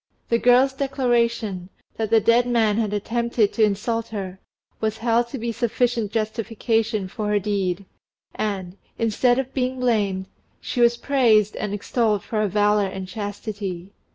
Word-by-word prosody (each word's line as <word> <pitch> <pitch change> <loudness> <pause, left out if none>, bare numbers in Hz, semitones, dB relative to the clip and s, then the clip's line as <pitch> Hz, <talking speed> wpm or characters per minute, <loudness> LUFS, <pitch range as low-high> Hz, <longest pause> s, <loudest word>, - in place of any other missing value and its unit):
The 230 - +2
girl's 250 +3 +4
declaration, 235 -8 0 0.3
that 220 -2 -1
the 225 0 +5
dead 235 +3 +3
man 225 -4 +2
had 220 -3 0
attempted 230 +1 0
to 225 - +2
insult 220 +3 0
her, 190 -3 -6 0.4
was 220 0 -1
held 235 +1 +1
to 270 - -6
be 235 0 -3
sufficient 235 -2 0
justification 225 0 -1
of 185 - -9
her 210 -2 0
deed, 195 -2 -1 0.5
and, 195 -3 -3 0.2
instead 245 +2 +2
of 265 0 -3
being 255 -1 -1
blamed, 205 -6 +1 0.3
she 245 - -3
was 235 0 +4
praised 230 -7 +3
and 210 - -3
extolled 210 0 0
for 220 - -4
her 210 - +2
valour 205 +1 +2
and 190 0 -6
chastity. 200 -2 -5
220 Hz, 155 wpm, -23 LUFS, 205-235 Hz, 0.5 s, the